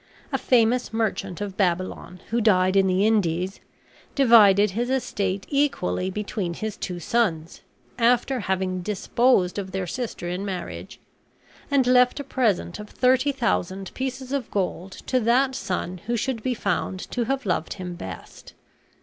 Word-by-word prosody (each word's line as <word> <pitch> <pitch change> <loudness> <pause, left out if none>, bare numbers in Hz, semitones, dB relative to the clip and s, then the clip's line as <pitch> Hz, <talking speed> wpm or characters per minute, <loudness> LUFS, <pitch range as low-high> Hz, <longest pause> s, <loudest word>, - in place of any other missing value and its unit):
A - - +3
famous 245 0 +2
merchant 205 -4 -2
of 200 -2 -4
Babylon, 180 -1 -2
who 235 +1 +1
died 185 -3 +3
in 195 -1 +4
the 185 +2 +2
Indies, 190 -4 +1 0.6
divided 210 -6 +6
his 240 +5 -2
estate 200 -7 -1
equally 270 - 0
between 195 -3 -3
his 215 +1 -4
two 180 -2 -5
sons, 170 -5 -1 0.4
after 245 +2 +2
having 185 -2 -1
disposed 205 0 +1
of 190 -1 -5
their 190 -1 -2
sister 225 -1 -5
in 180 +2 -3
marriage, 190 -3 -6 0.7
and 280 -3 +3
left 250 +2 +4
a - - -3
present 220 -9 0
of 210 0 -8
thirty 255 +2 +2
thousand 195 -7 -2
pieces 260 0 -4
of 275 -4 -2
gold 190 -1 -2
to 255 - +1
that 250 +3 +2
son 185 -6 -3
who 240 0 0
should 245 0 -2
be 250 +2 -1
found 190 -2 -2
to 240 -2 -1
have 270 +1 -2
loved 175 -4 -1
him 180 -2 -6
best. 95 - -10
205 Hz, 150 wpm, -24 LUFS, 185-245 Hz, 0.7 s, divided